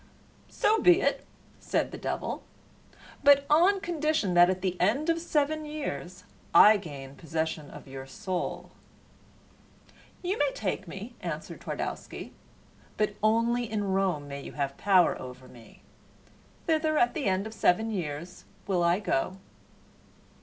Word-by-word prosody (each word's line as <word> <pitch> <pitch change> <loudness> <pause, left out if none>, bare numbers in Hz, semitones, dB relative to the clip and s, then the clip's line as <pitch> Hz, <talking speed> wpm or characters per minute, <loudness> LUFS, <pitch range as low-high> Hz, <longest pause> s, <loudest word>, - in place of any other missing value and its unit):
"So 440 +1 +2
be 360 -2 +6
it," - - 0 0.3
said - - -1
the - - -6
devil. - - -3 0.8
"But 280 0 +6
on 360 +6 +5
condition 310 - 0
that 175 0 +7
at 185 0 -2
the 185 -2 0
end 275 - +2
of 330 - -1
seven 310 -1 0
years 295 - -5 0.3
I 215 +1 +9
gain 140 -8 -9
possession 160 -1 -3
of - - -12
your 135 0 -8
soul." 185 +1 -4 1.5
"You 370 +4 -1
may 290 -1 +2
take 195 -4 -3
me," 200 +8 -8
answered 165 -3 -6
Twardowski, - - -5 0.6
"but 210 -1 +1
only 230 +2 +2
in 205 -3 -1
Rome 185 -7 0
may 140 0 -6
you - - -9
have 140 -1 -2
power 190 -3 +3
over 130 0 -9
me. 120 -3 -16 0.8
Thither, 310 -1 +1
at 240 -2 +3
the 300 -5 -3
end 190 +1 +1
of 220 - -7
seven 220 +1 +2
years, 170 -2 -5 0.2
will 185 -2 +1
I 170 +2 +3
go." 185 -2 -1
200 Hz, 140 wpm, -28 LUFS, 170-285 Hz, 1.5 s, I